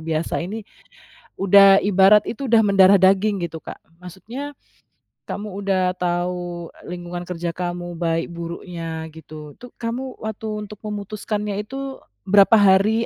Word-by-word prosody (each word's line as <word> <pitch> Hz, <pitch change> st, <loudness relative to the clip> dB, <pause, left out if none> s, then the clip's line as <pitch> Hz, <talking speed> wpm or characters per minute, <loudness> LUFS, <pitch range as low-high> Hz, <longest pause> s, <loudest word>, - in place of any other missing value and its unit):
biasa 160 Hz, 0 st, -2 dB
ini, 200 Hz, +5 st, -5 dB, 0.7 s
udah, 195 Hz, 0 st, +7 dB
ibarat 200 Hz, +1 st, +5 dB
itu 265 Hz, +3 st, -5 dB
udah 230 Hz, -1 st, +6 dB
mendarah 195 Hz, -1 st, +6 dB
daging 195 Hz, +2 st, +3 dB
gitu, 160 Hz, -1 st, -8 dB
Kak. -, -, -9 dB, 0.2 s
Maksudnya, 235 Hz, -, -8 dB, 0.7 s
kamu 205 Hz, -2 st, -6 dB
udah 185 Hz, -2 st, +1 dB
tahu 175 Hz, -1 st, -3 dB, 0.2 s
lingkungan 175 Hz, 0 st, -6 dB
kerja 170 Hz, -1 st, -4 dB
kamu 175 Hz, -1 st, -4 dB
baik 165 Hz, -1 st, -1 dB
buruknya, 170 Hz, -1 st, -6 dB
gitu, 155 Hz, -2 st, -11 dB
itu 245 Hz, 0 st, -13 dB
kamu 250 Hz, +3 st, -5 dB
waktu 220 Hz, 0 st, -6 dB, 0.2 s
untuk 210 Hz, -, -10 dB
memutuskannya 210 Hz, 0 st, -4 dB
itu 270 Hz, +4 st, -7 dB, 0.3 s
berapa 200 Hz, +3 st, +6 dB
hari 205 Hz, +4 st, +4 dB
190 Hz, 130 wpm, -21 LUFS, 175-210 Hz, 0.7 s, udah